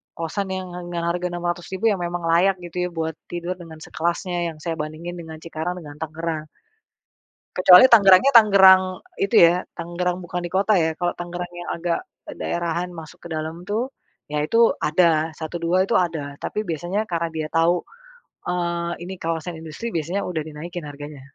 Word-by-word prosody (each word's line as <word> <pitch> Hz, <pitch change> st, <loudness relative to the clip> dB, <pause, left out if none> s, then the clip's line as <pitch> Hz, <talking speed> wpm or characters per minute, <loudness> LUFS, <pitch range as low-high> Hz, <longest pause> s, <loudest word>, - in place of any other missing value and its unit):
kosan 170 Hz, +5 st, -3 dB
yang 185 Hz, 0 st, -4 dB, 0.2 s
yang 170 Hz, -1 st, -2 dB
harga 175 Hz, +1 st, -1 dB
600.000 175 Hz, +3 st, -3 dB
yang -, -, +1 dB
memang 175 Hz, 0 st, -3 dB
layak 180 Hz, +4 st, +4 dB
gitu 180 Hz, +1 st, -3 dB
ya -, -, -7 dB
buat 160 Hz, -2 st, -3 dB, 0.2 s
tidur 175 Hz, +1 st, -3 dB
dengan 165 Hz, -3 st, -11 dB
sekelasnya 175 Hz, 0 st, -2 dB
yang 155 Hz, -, -14 dB
saya 165 Hz, -2 st, -2 dB
bandingin 155 Hz, +3 st, -5 dB
dengan 160 Hz, -1 st, -8 dB
Cikarang 165 Hz, +2 st, -4 dB
dengan 150 Hz, -4 st, -10 dB
Tangerang. 160 Hz, 0 st, -3 dB, 1.1 s
Kecuali 185 Hz, +4 st, +9 dB
Tangerang-nya 205 Hz, +3 st, +7 dB
Tangerang 195 Hz, -4 st, +8 dB, 0.4 s
itu 195 Hz, -, +1 dB
ya, 180 Hz, +2 st, +1 dB
Tangerang 175 Hz, +1 st, -2 dB
bukan 180 Hz, 0 st, -4 dB
di 175 Hz, -, -5 dB
kota 200 Hz, +3 st, +3 dB
ya, 160 Hz, -3 st, +2 dB
kalau 175 Hz, 0 st, 0 dB
Tangerang 175 Hz, 0 st, -5 dB
yang 175 Hz, 0 st, -7 dB
agak, 170 Hz, 0 st, -1 dB, 0.3 s
eee, -, -, -7 dB
daerahan 170 Hz, +1 st, -2 dB
masuk 165 Hz, -2 st, -11 dB
ke 170 Hz, -, -9 dB
dalam 160 Hz, +2 st, -4 dB
tuh, 215 Hz, +7 st, -1 dB, 0.4 s
ya 150 Hz, 0 st, -1 dB
itu 230 Hz, +8 st, +4 dB
ada, 160 Hz, 0 st, +3 dB
satu 160 Hz, +1 st, -5 dB
dua 185 Hz, +3 st, +2 dB
itu -, -, +1 dB
ada, 160 Hz, -5 st, 0 dB
tapi 210 Hz, -1 st, -3 dB
biasanya 175 Hz, +6 st, -2 dB
karena 170 Hz, -2 st, -1 dB
dia 155 Hz, -1 st, -3 dB
tahu, 165 Hz, +2 st, +2 dB, 0.7 s
eee, 170 Hz, -1 st, -1 dB
ini 190 Hz, +2 st, -6 dB
kawasan 165 Hz, 0 st, -3 dB
industri 165 Hz, +9 st, -6 dB
biasanya 170 Hz, +5 st, -2 dB
udah 170 Hz, -3 st, -2 dB
dinaikin 155 Hz, +1 st, -7 dB
harganya. 145 Hz, 0 st, -9 dB
175 Hz, 170 wpm, -23 LUFS, 160-180 Hz, 1.1 s, Kecuali